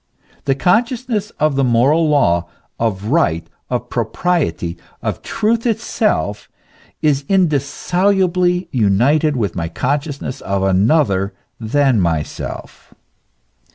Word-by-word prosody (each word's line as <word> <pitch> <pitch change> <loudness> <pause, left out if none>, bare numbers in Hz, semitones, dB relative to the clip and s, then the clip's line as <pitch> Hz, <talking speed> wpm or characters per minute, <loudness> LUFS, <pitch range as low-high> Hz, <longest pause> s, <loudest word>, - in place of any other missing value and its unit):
The 135 - +2
consciousness 225 - 0
of 150 -2 +2
the 135 - +2
moral 135 +7 +3
law, 85 - +2 0.3
of 105 -2 -1
right, 85 - +2 0.2
of - - -3
propriety, 90 - -1 0.3
of - - -3
truth 225 +2 0
itself, 215 - -1 0.5
is 145 -2 +2
indissolubly 180 +2 +1
united 130 +7 +2
with 105 -7 -1
my 85 -1 -2
consciousness 140 - -3
of 100 0 -1
another 95 - +2 0.2
than 125 0 +2
myself. 80 -4 -4
140 Hz, 100 wpm, -18 LUFS, -, 0.5 s, moral